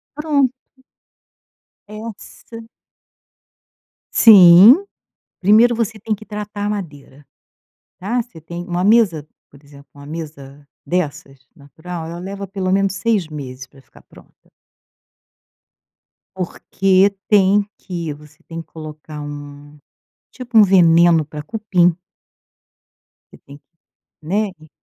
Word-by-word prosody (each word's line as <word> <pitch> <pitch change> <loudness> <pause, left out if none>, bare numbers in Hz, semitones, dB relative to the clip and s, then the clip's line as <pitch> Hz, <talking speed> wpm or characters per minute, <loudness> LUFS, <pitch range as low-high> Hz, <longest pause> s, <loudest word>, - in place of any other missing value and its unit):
Pronto. 290 -4 0 1.3
Essa 225 +1 -11 1.5
Sim, 205 - +8 0.6
primeiro 220 +5 +4
você 225 -1 -3
tem 215 +1 -2
que 215 +1 -13
tratar 210 -1 -6
a 205 - -1
madeira, 145 -8 -8 0.8
tá, 225 +7 -1
você 235 -8 -10
tem 170 +3 -8
uma 175 -1 -2
mesa 200 -7 +3 0.2
por 140 +1 -20
exemplo, 140 -1 -17
uma 140 0 -13
mesa 145 -2 -10 0.2
dessas 145 -6 -4
natural 160 +4 -9
ela 170 - -8
leva 195 +1 -7
pelo 190 -1 -3
menos 195 0 +1
6 205 -4 -1
meses 135 -4 -8
pra 135 - -20
ficar - - -21
pronta. - - -22 1.9
Porque 190 +1 0
tem 205 0 +3
que 170 -5 -6
você 150 0 -19
tem 165 0 -7
que - - -28
colocar 155 -1 -10
um, 145 0 -10 0.6
tipo, 245 -3 -3
um 215 - +9
veneno 170 -4 +4
pra 150 +1 -8
cupim. 180 -2 0 1.4
Você - - -16
tem 140 +1 -13 0.6
né, 200 +6 -1
in 155 - -17
180 Hz, 115 wpm, -18 LUFS, 150-210 Hz, 1.9 s, um